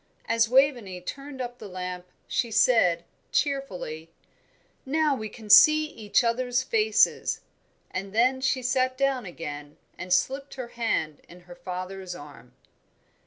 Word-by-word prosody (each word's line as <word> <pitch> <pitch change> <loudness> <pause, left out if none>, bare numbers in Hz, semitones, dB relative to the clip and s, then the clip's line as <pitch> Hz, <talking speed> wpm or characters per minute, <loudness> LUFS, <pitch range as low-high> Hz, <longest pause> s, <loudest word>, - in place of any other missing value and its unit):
As 230 -1 +2
Waveney 250 -8 +2
turned 275 +8 -7
up 245 0 -6
the 210 - -8
lamp 180 -1 -6 0.2
she 235 - -1
said, 210 -7 +3 0.3
cheerfully, 185 - -2 0.7
"Now 300 +1 +1
we 215 -4 -5
can 220 0 -12
see 305 +9 +8
each 225 -5 0
other's 245 +2 0
faces," 220 -3 +2 0.5
and 195 +1 -5
then 250 +5 +2
she 260 -1 0
sat 255 +1 +1
down 270 -5 0
again 145 -4 -8 0.2
and 180 - -7
slipped 270 +10 0
her 255 -3 -6
hand 160 -11 -2
in 180 +1 -14
her 175 0 -13
father's 185 +1 -6
arm. 145 -5 -13
225 Hz, 135 wpm, -26 LUFS, 180-260 Hz, 0.7 s, see